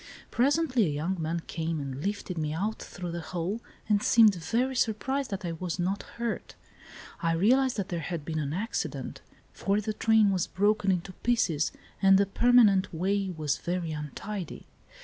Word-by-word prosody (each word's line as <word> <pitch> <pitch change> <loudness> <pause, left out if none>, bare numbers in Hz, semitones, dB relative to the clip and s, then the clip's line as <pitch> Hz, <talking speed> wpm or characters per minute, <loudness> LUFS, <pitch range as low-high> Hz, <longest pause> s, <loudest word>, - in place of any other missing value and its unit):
Presently 260 - +2
a 145 - -2
young 170 +4 -2
man 165 +2 -1
came 165 -1 -3
and 140 0 -5
lifted 200 -2 -3
me 155 -2 -2
out 205 +7 -2
through 180 -1 -6
the 170 - -4
hole, 180 +6 -3 0.3
and 210 -2 +3
seemed 220 -2 +6
very 235 +9 -1
surprised 260 +4 0
that 195 -3 -4
I 170 - -2
was 170 +1 -4
not 190 +3 -1 0.2
hurt. 235 -1 -3 0.7
I 165 -2 +1
realised 245 +9 +3
that 200 - -2
there 175 - -2
had 165 -1 -4
been 155 0 -2
an 145 -2 -2
accident, 205 +8 -3 0.3
for 200 +1 0
the 215 +1 -2
train 220 -1 +4
was 185 -2 0
broken 205 0 +1
into 185 +1 -2
pieces 180 -10 +1 0.3
and 195 -1 +7
the 200 - +4
permanent 210 -2 +4
way 195 +4 0
was 150 -2 -1
very 175 -2 -2
untidy. 160 +6 -6
190 Hz, 170 wpm, -28 LUFS, 165-215 Hz, 0.7 s, and